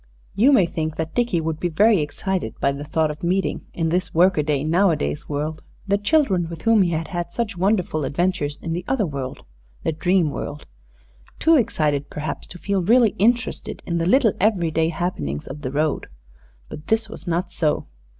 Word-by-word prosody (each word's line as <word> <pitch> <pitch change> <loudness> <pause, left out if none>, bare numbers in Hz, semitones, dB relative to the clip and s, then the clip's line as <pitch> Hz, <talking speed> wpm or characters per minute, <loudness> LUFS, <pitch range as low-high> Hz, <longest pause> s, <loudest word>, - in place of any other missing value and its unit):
You 250 +8 +4
may 210 -10 +5
think 160 -2 -3
that 160 0 -4
Dickie 235 -9 +1
would 160 -1 -3
be 175 - 0
very 205 +5 +4
excited 150 -1 -3
by 140 - +2
the 140 +1 -6
thought 155 +1 0
of 150 - -10
meeting, 185 +3 -1
in 165 -1 -1
this 180 +1 -1
workaday, 155 -5 +3
nowadays 160 - +1
world, 155 +2 -3 0.3
the 200 0 +2
children 205 - +2
with 165 -2 -8
whom 225 -2 +5
he 180 - +3
had 160 -1 -2
had 175 -1 -4
such 230 0 -2
wonderful 180 -4 +1
adventures 150 -1 -1
in 165 - -2
the 175 +2 -3
other 250 -6 +1
world, 135 -5 -5 0.4
the - - +1
dream 175 0 +1
world 145 +1 -6 0.7
too 325 0 +4
excited, 150 - +1
perhaps, 150 -1 -5
to 180 - -10
feel 200 +1 -1
really 225 +4 +4
interested 235 +3 0
in 170 -1 -1
the 165 - 0
little 240 -2 +4
every 185 -6 +2
day 160 +1 +1
happenings 115 - -3
of 145 - -8
"the 130 - -3
road." 150 +2 -1 0.6
But 150 - -10
this 225 0 +1
was 200 -3 -11
not 175 +1 -1
so. 155 -3 0
170 Hz, 190 wpm, -22 LUFS, 155-195 Hz, 0.7 s, may